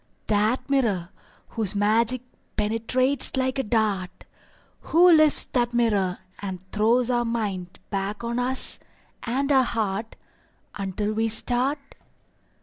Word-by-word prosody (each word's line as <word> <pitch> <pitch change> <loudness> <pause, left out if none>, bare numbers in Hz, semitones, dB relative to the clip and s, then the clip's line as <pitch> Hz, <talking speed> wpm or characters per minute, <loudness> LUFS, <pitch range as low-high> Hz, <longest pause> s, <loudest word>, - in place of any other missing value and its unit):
That 215 +4 +1
mirror 220 -11 0 0.4
Whose 215 -3 -3
magic 225 +4 +1 0.3
penetrates 235 +6 +1
like 260 +1 0
a - - +1
dart, 210 -5 -1 0.6
Who 350 +2 +5
lifts 310 -2 +5
that 240 -1 0
mirror 205 -6 +1 0.2
And 190 -2 -5
throws 230 +4 +2
our 240 -1 +1
mind 205 -6 -4
back 200 +2 -3
on 235 +1 -2
us, 255 +1 +2 0.4
and 270 +4 -1
our 265 -2 +5
heart, 220 -3 -2 0.6
Until 205 +2 -3
we 225 +1 0
start? 250 +5 +2
230 Hz, 120 wpm, -24 LUFS, 205-255 Hz, 0.6 s, Who